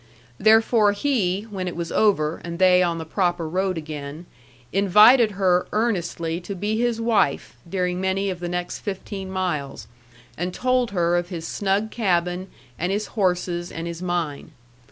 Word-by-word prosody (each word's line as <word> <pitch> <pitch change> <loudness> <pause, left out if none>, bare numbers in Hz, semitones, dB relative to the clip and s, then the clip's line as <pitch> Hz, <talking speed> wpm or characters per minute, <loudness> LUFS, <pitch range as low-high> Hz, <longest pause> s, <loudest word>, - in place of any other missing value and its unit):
Therefore 220 0 +4
he, 205 -6 0
when 185 -2 -4
it 175 - -4
was 170 0 -4
over, 165 -7 +2
and 170 0 -5
they 185 0 +5
on 170 -2 +1
the 160 - -5
proper 175 0 -1
road 185 +2 -1
again, 155 +1 -7 0.5
invited 210 +4 +6
her 185 -2 +2
earnestly 175 -6 -1
to 195 +3 -6
be 205 +4 -2
his 240 -1 0
wife 225 - +1
during 180 -1 -1
many 190 +1 0
of 180 - -6
the 175 0 -4
next 175 0 -3
fifteen 195 -1 -6
miles, 155 - -3 0.5
and 180 +1 -3
told 255 -1 +1
her 175 -3 +1
of 175 0 -1
his 170 -3 -5
snug 205 +2 -1
cabin 180 -3 0 0.3
and 175 +3 -1
his 205 +1 -2
horses 180 -3 -1
and 165 - -5
his 170 0 -6
mine. 165 -4 -3
185 Hz, 160 wpm, -23 LUFS, 170-205 Hz, 0.5 s, invited